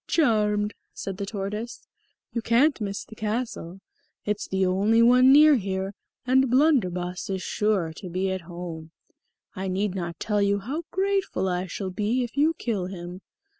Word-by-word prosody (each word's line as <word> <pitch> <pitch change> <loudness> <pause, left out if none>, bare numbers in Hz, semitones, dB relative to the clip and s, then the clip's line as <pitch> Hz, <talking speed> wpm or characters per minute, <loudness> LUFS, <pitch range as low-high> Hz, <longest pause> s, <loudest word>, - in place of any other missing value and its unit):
"Charmed," 210 -8 +2 0.2
said 195 -1 -5
the 200 -1 -4
tortoise. 210 +3 -5 0.5
"You 235 - -1
can't 240 +4 +3
miss 200 -1 -3
the - - -13
castle; 215 -5 -4 0.4
it's 210 0 -2
the 190 0 +1
only 205 +5 +3
one 250 +2 +6
near 300 0 +7
here, 195 -1 -3 0.3
and 260 +1 +3
Blunderbus 190 - +1
is 190 -1 -2
sure 200 -6 0
to 185 - -7
be 185 +2 -1
at 190 -1 -3
home. 170 -2 -8 0.7
I 190 0 -3
need 190 +1 -1
not 170 -3 -5
tell 210 -2 0
you 200 0 +2
how 275 - -4
grateful 385 - 0
I 180 0 -1
shall 190 +2 -4
be 215 +7 0
if 240 - -7
you 310 +3 +3
kill 205 -10 -2
him. 180 0 -8
205 Hz, 165 wpm, -25 LUFS, 185-240 Hz, 0.7 s, near